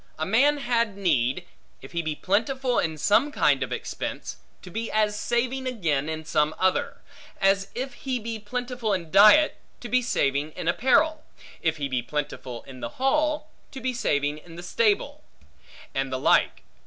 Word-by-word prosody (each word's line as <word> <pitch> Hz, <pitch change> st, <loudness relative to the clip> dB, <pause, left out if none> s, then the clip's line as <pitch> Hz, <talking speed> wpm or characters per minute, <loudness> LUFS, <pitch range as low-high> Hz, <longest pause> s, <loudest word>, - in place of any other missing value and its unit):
A 155 Hz, -, -2 dB
man 275 Hz, -, +4 dB
had 235 Hz, -6 st, 0 dB
need, 135 Hz, -10 st, +1 dB, 0.4 s
if 135 Hz, -, -11 dB
he 170 Hz, -, -1 dB
be 155 Hz, -2 st, -3 dB
plentiful 245 Hz, -, 0 dB
in 160 Hz, -1 st, -1 dB
some 220 Hz, -, +3 dB
kind -, -, +2 dB
of -, -, -3 dB
expense, -, -, -5 dB, 0.3 s
to 180 Hz, -, -10 dB
be 225 Hz, +4 st, -3 dB
as 215 Hz, -1 st, +2 dB
saving 250 Hz, +4 st, -1 dB
again 160 Hz, -, -1 dB
in 160 Hz, 0 st, -5 dB
some 155 Hz, 0 st, +1 dB
other. 185 Hz, 0 st, 0 dB, 0.4 s
As 195 Hz, 0 st, +3 dB
if 260 Hz, +1 st, -4 dB
he 260 Hz, +1 st, -3 dB
be 225 Hz, -1 st, -5 dB
plentiful 245 Hz, 0 st, -3 dB
in 170 Hz, -4 st, -3 dB
diet, 215 Hz, +11 st, +7 dB, 0.2 s
to 240 Hz, -, -7 dB
be 255 Hz, +3 st, +3 dB
saving 145 Hz, -, 0 dB
in -, -, -6 dB
apparel; 310 Hz, +4 st, +3 dB, 0.4 s
if 160 Hz, -1 st, 0 dB
he 140 Hz, -1 st, -2 dB
be 130 Hz, -2 st, -1 dB
plentiful 130 Hz, -2 st, -5 dB
in 130 Hz, -2 st, -11 dB
the -, -, -7 dB
hall, 305 Hz, +3 st, +1 dB, 0.2 s
to 265 Hz, -, -8 dB
be 260 Hz, -1 st, -2 dB
saving 145 Hz, -, 0 dB
in 165 Hz, +1 st, -14 dB
the 175 Hz, -, -8 dB
stable; 420 Hz, -, 0 dB, 0.7 s
and 135 Hz, 0 st, -2 dB
the 130 Hz, -, -1 dB
like. 130 Hz, -, +2 dB
210 Hz, 175 wpm, -25 LUFS, 155-255 Hz, 0.7 s, diet